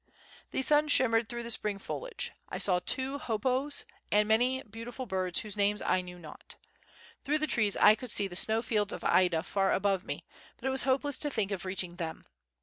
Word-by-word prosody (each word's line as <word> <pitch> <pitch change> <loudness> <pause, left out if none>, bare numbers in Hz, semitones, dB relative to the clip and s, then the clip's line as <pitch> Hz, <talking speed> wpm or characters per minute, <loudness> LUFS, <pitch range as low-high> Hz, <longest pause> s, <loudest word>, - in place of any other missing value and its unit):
The 265 - -1
sun 300 +2 +4
shimmered 230 -5 +4
through 240 0 -5
the 235 - -1
spring 210 -2 0
foliage. - - -5 0.2
I - - -4
saw 180 -2 +3
two 265 +8 -1
hoopoes 255 +5 -1 0.3
and 210 0 +3
many 250 +4 +2
beautiful 230 +4 -8
birds 185 -4 0
whose 210 -3 -7
names 205 0 +1
I 185 - +1
knew 180 0 -10
not. 160 -3 -10 0.7
Through 295 +2 +1
the 310 - 0
trees 215 -7 0
I 210 - +7
could 245 +3 -7
see 205 -2 +2
the 175 - -9
snow 220 +4 +3
fields 210 -3 0
of - - -7
Ida 175 -3 +3
far 195 0 0
above 195 -1 +1
me, - - -6 0.3
but - - -12
it 265 - +1
was 265 -1 +3
hopeless 275 +1 +1
to 295 - 0
think 215 -7 -2
of 195 -1 -4
reaching 185 -2 -4
them. 165 -2 -6
220 Hz, 205 wpm, -30 LUFS, 195-260 Hz, 0.7 s, I